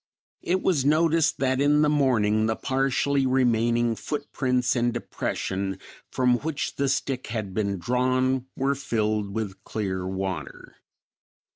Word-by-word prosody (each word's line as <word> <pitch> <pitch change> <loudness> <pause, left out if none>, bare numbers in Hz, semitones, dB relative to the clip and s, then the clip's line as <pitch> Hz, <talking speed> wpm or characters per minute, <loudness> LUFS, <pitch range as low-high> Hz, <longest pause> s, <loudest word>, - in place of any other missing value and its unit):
It 185 +2 0
was 155 -8 +2
noticed 160 +2 +3
that 130 0 +1
in 150 +1 +4
the - - +4
morning 115 -7 +2
the 110 - 0
partially 135 +1 +1
remaining 120 -2 +2
foot 145 +5 -5
prints 125 -2 +1
and 120 0 +1
depression, 95 -4 -3 0.3
from 125 -1 +2
which 155 -1 -3
the 140 -1 +1
stick 135 -1 -2
had 110 -4 -4
been 100 -1 -1
drawn, 130 +5 0
were 135 +1 +1
filled 110 -6 -1
with 100 -2 -5
clear 95 -4 -3
water. 95 0 -5
125 Hz, 135 wpm, -25 LUFS, 110-135 Hz, 0.3 s, in